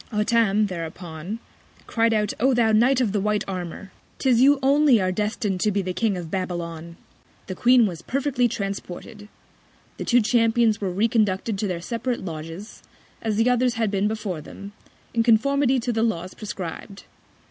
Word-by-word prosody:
Hottam, 215 Hz, -1 st, +2 dB
thereupon, 170 Hz, +1 st, -6 dB, 0.5 s
cried 230 Hz, 0 st, +1 dB
out, 210 Hz, -2 st, +1 dB
O 260 Hz, +3 st, +3 dB
thou 230 Hz, -2 st, +3 dB
Knight 245 Hz, +4 st, +4 dB
of 225 Hz, -5 st, +1 dB
the 210 Hz, -, 0 dB
white 210 Hz, +1 st, 0 dB
Armour! 185 Hz, +1 st, -6 dB, 0.3 s
'Tis 250 Hz, -3 st, +3 dB
you 280 Hz, +2 st, +6 dB
only 280 Hz, -3 st, +5 dB
are 185 Hz, -1 st, 0 dB
destin'd 210 Hz, -1 st, -2 dB
to 210 Hz, -, +2 dB
be 200 Hz, -1 st, 0 dB
the 185 Hz, 0 st, -3 dB
King 200 Hz, +1 st, 0 dB
of 170 Hz, -3 st, -7 dB
Babylon. 170 Hz, -3 st, -4 dB, 0.5 s
The 185 Hz, -, -5 dB
Queen 245 Hz, +4 st, +4 dB
was 175 Hz, -5 st, -4 dB
perfectly 265 Hz, +2 st, 0 dB
transported. 200 Hz, -1 st, -6 dB, 0.7 s
The -, -, -5 dB
two 245 Hz, 0 st, +4 dB
Champions 225 Hz, 0 st, +2 dB
were 190 Hz, -2 st, -1 dB
reconducted 210 Hz, +1 st, +1 dB
to 210 Hz, -, -1 dB
their 175 Hz, -3 st, -3 dB
separate 235 Hz, +3 st, -3 dB
Lodges, 165 Hz, +5 st, -8 dB, 0.4 s
as 220 Hz, -2 st, -1 dB
the 225 Hz, +3 st, +2 dB
others 250 Hz, 0 st, +2 dB
had 225 Hz, -3 st, 0 dB
been 200 Hz, 0 st, +1 dB
before 210 Hz, -7 st, -3 dB
them, 200 Hz, +6 st, -10 dB, 0.4 s
in 230 Hz, -, +2 dB
Conformity 260 Hz, +4 st, +3 dB
to 240 Hz, +1 st, -2 dB
the 225 Hz, -, 0 dB
Laws 185 Hz, -6 st, -1 dB
prescrib'd. 195 Hz, -1 st, -7 dB
210 Hz, 170 wpm, -24 LUFS, 185-235 Hz, 0.7 s, you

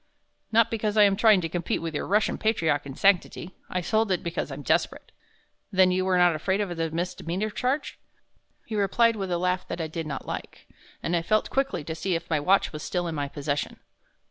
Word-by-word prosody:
"Not 230 Hz, +1 st, +4 dB
because 215 Hz, -1 st, -1 dB
I 210 Hz, -, +8 dB
am 200 Hz, -1 st, +4 dB
trying 215 Hz, -2 st, +5 dB
to 165 Hz, -, -2 dB
compete 170 Hz, +1 st, -2 dB
with 165 Hz, -1 st, -4 dB
your 145 Hz, -, -3 dB
Russian 210 Hz, +3 st, +1 dB
patriarch 160 Hz, -10 st, +1 dB
in 135 Hz, -, -7 dB
sanctity. 185 Hz, -1 st, +1 dB, 0.2 s
I 180 Hz, -, -1 dB
sold 220 Hz, +3 st, +1 dB
it 180 Hz, -, 0 dB
because 170 Hz, -2 st, -3 dB
I'm 140 Hz, +1 st, -7 dB
desperate." -, -, 0 dB, 0.6 s
"Then 185 Hz, -2 st, +4 dB
you 185 Hz, +1 st, 0 dB
were 185 Hz, -1 st, +2 dB
not 175 Hz, -1 st, +5 dB
afraid 190 Hz, +6 st, -1 dB
of 195 Hz, -4 st, -2 dB
the 165 Hz, 0 st, -1 dB
misdemeanor 180 Hz, +4 st, -3 dB
charge?" 265 Hz, +7 st, -2 dB, 0.7 s
He 225 Hz, -, -8 dB
replied 225 Hz, +3 st, +3 dB
with 195 Hz, -3 st, -4 dB
a 175 Hz, -, 0 dB
laugh 180 Hz, +1 st, -1 dB
that -, -, -5 dB
I 165 Hz, -, -1 dB
did 160 Hz, 0 st, -5 dB
not 140 Hz, -3 st, -5 dB
like, -, -, -7 dB, 0.4 s
and 175 Hz, -, 0 dB
I 170 Hz, -, +1 dB
felt 215 Hz, +6 st, +1 dB
quickly 270 Hz, -, 0 dB
to 160 Hz, -, -5 dB
see 180 Hz, +3 st, -2 dB
if 165 Hz, +1 st, -4 dB
my 155 Hz, -, +2 dB
watch 185 Hz, +5 st, +2 dB
was 155 Hz, -, -6 dB
still 175 Hz, +2 st, -2 dB
in 165 Hz, -, -3 dB
my 145 Hz, -2 st, -2 dB
possession. 145 Hz, +1 st, -3 dB
180 Hz, 220 wpm, -26 LUFS, 165-205 Hz, 0.7 s, I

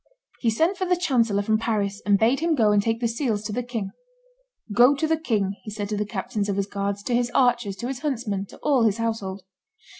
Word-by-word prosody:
He 235 Hz, -, +1 dB
sent 325 Hz, -, +1 dB
for 375 Hz, -, -1 dB
the 360 Hz, 0 st, +2 dB
chancellor 230 Hz, -, +1 dB
from 215 Hz, +1 st, +1 dB
Paris, 205 Hz, -3 st, -1 dB
and 200 Hz, -1 st, +5 dB
bade 230 Hz, +6 st, +3 dB
him 330 Hz, 0 st, +1 dB
go 220 Hz, -6 st, +3 dB
and 205 Hz, -1 st, +4 dB
take 225 Hz, +2 st, -1 dB
the 235 Hz, -, +2 dB
seals 230 Hz, -3 st, -1 dB
to 215 Hz, -1 st, -4 dB
the 245 Hz, -, -1 dB
king. 230 Hz, -5 st, -4 dB, 0.8 s
"Go 245 Hz, +6 st, +6 dB
to 280 Hz, -, -1 dB
the 320 Hz, +1 st, +2 dB
king," 210 Hz, -11 st, -1 dB
he -, -, -8 dB
said 205 Hz, -1 st, -4 dB
to 210 Hz, -, -1 dB
the 210 Hz, 0 st, -2 dB
captains 210 Hz, 0 st, -3 dB
of 200 Hz, -, 0 dB
his 200 Hz, 0 st, 0 dB
guards, 200 Hz, 0 st, -3 dB
to 245 Hz, -, -2 dB
his 240 Hz, 0 st, +1 dB
archers, 240 Hz, -6 st, +2 dB
to 235 Hz, +6 st, -5 dB
his 265 Hz, -1 st, -4 dB
huntsmen, 230 Hz, -9 st, -2 dB
to -, -, -14 dB
all 275 Hz, -4 st, +3 dB
his 220 Hz, -2 st, +3 dB
household. 210 Hz, -4 st, -3 dB
225 Hz, 240 wpm, -24 LUFS, 205-250 Hz, 0.8 s, Go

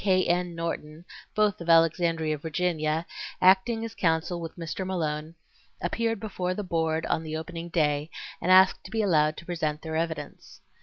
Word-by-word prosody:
K. 185 Hz, -2 st, +3 dB
N. 175 Hz, 0 st, 0 dB
Norton, 165 Hz, -1 st, -5 dB, 0.3 s
both 210 Hz, -4 st, +2 dB
of 170 Hz, -, -6 dB
Alexandria, 165 Hz, -1 st, +3 dB
Virginia, 160 Hz, 0 st, -1 dB, 0.3 s
acting 195 Hz, +5 st, +4 dB
as 225 Hz, -, -7 dB
counsel 170 Hz, -1 st, 0 dB
with 165 Hz, -1 st, -6 dB
Mr. 170 Hz, +2 st, -4 dB
Malone, 160 Hz, -3 st, -3 dB, 0.4 s
appeared 225 Hz, +5 st, -1 dB
before 185 Hz, -4 st, -3 dB
the 210 Hz, -, -3 dB
Board 160 Hz, -2 st, 0 dB
on -, -, 0 dB
the 155 Hz, -1 st, -4 dB
opening 165 Hz, +1 st, -6 dB
day 150 Hz, -2 st, +1 dB, 0.3 s
and 185 Hz, -, +1 dB
asked 190 Hz, +1 st, +6 dB
to -, -, -8 dB
be 220 Hz, -1 st, 0 dB
allowed 155 Hz, -5 st, +3 dB
to 170 Hz, -, -9 dB
present 155 Hz, -4 st, -2 dB
their 160 Hz, -1 st, -4 dB
evidence. 160 Hz, -3 st, -4 dB
170 Hz, 165 wpm, -27 LUFS, 160-185 Hz, 0.4 s, asked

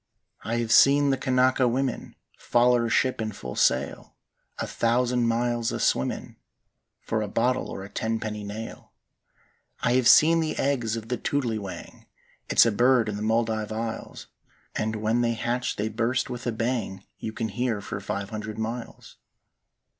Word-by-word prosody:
"I 115 Hz, -, -2 dB
hev 115 Hz, -1 st, -2 dB
seen 140 Hz, +2 st, +6 dB
the -, -, +3 dB
Kanaka 130 Hz, -1 st, +2 dB
women 130 Hz, +1 st, -2 dB, 0.2 s
Foller 120 Hz, 0 st, +2 dB
a -, -, -3 dB
ship'n 115 Hz, -3 st, +1 dB
full 65 Hz, -10 st, -8 dB
sail, 65 Hz, +2 st, 0 dB, 0.4 s
A -, -, -2 dB
thousand 120 Hz, +1 st, +1 dB
miles 120 Hz, 0 st, 0 dB
a -, -, -3 dB
swimmin' 65 Hz, +1 st, -1 dB, 0.7 s
For 110 Hz, -, -1 dB
a 105 Hz, -, -2 dB
bottle 125 Hz, +5 st, 0 dB
or 95 Hz, -, -6 dB
a 100 Hz, -, -9 dB
tenpenny 110 Hz, -1 st, -3 dB
nail. 105 Hz, +2 st, -8 dB, 0.9 s
"I 120 Hz, -, +2 dB
hev 125 Hz, -1 st, +3 dB
seen 165 Hz, +2 st, +7 dB
the 160 Hz, -1 st, -2 dB
eggs 120 Hz, -5 st, 0 dB
of 115 Hz, 0 st, -7 dB
the 125 Hz, -, -1 dB
toodly 120 Hz, -6 st, -1 dB
wang; 100 Hz, -2 st, -9 dB, 0.4 s
It's -, -, +6 dB
a 115 Hz, -, +3 dB
bird 120 Hz, +1 st, +3 dB
in 105 Hz, -, -3 dB
the 105 Hz, -, -5 dB
Muldive 110 Hz, -1 st, 0 dB
Isles; 110 Hz, +1 st, -5 dB, 0.5 s
And 110 Hz, 0 st, -2 dB
when 110 Hz, +2 st, 0 dB
they 115 Hz, -1 st, +1 dB
hatch 120 Hz, +2 st, -2 dB
they 105 Hz, -, -2 dB
burst 115 Hz, +3 st, -1 dB
with 120 Hz, 0 st, -5 dB
a -, -, +1 dB
bang 110 Hz, -4 st, -3 dB
You 110 Hz, -, -4 dB
can 110 Hz, 0 st, -3 dB
hear 120 Hz, 0 st, -1 dB
five 100 Hz, 0 st, -5 dB
hundred 110 Hz, 0 st, -5 dB
miles. 115 Hz, +2 st, -6 dB
115 Hz, 160 wpm, -26 LUFS, 110-125 Hz, 0.9 s, seen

